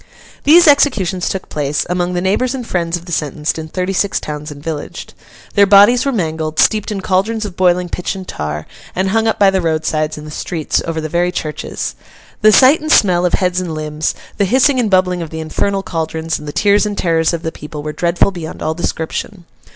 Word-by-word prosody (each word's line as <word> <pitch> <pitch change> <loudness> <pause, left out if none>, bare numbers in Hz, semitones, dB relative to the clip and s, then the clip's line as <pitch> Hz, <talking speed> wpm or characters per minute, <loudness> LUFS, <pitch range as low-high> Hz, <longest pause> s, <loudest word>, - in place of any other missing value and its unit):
These 330 +3 +7
executions 215 - +3
took 190 - -4
place, 145 -1 -2
among 180 0 -1
the 175 - 0
neighbours 235 +8 0
and 250 -3 -5
friends 170 -4 -1
of 170 - -13
the 175 - -9
sentenced, 150 0 -2
in 160 - -6
thirty 185 +3 -3
six 195 +1 0
towns 150 0 -6
and 145 -1 -10
villages. 155 -2 -6 0.4
Their 200 -1 +5
bodies 205 +6 +6
were - - +2
mangled, 160 -7 -2
steeped 215 0 +2
in 200 -2 -3
caldrons 210 +4 0
of 195 -4 -7
boiling 180 -1 +2
pitch 180 +2 -3
and 190 -1 -8
tar, 75 0 -4 0.3
and 190 +1 0
hung 225 +2 +1
up 220 - +1
by 200 -1 +5
the 190 -1 0
roadsides, 155 -2 -1
in 150 - -9
the 155 - -9
streets, 160 0 -2
over 165 -1 -2
the 155 - -3
very 175 +3 0
churches. 155 -4 -4 0.5
The 215 0 +6
sight 265 +8 +6
and 310 0 -2
smell 180 - +4
of - - -4
heads 180 -1 0
and 170 -3 -4
limbs, 155 0 -2 0.2
the 200 - +2
hissing 260 +5 +3
and 230 -4 +1
bubbling 185 -2 +2
of 165 - -5
the 160 - -6
infernal 195 +5 -1
caldrons, 160 -2 -3
and 150 - -10
the - - -3
tears 205 +5 +2
and 205 -1 -4
terrors 165 -2 +1
of 170 -1 -4
the 160 - -2
people, 150 -1 -8
were 150 0 -4
dreadful 170 +4 +1
beyond 170 -4 -7
all 155 - 0
description. 170 +2 -4
180 Hz, 220 wpm, -16 LUFS, 160-200 Hz, 0.5 s, These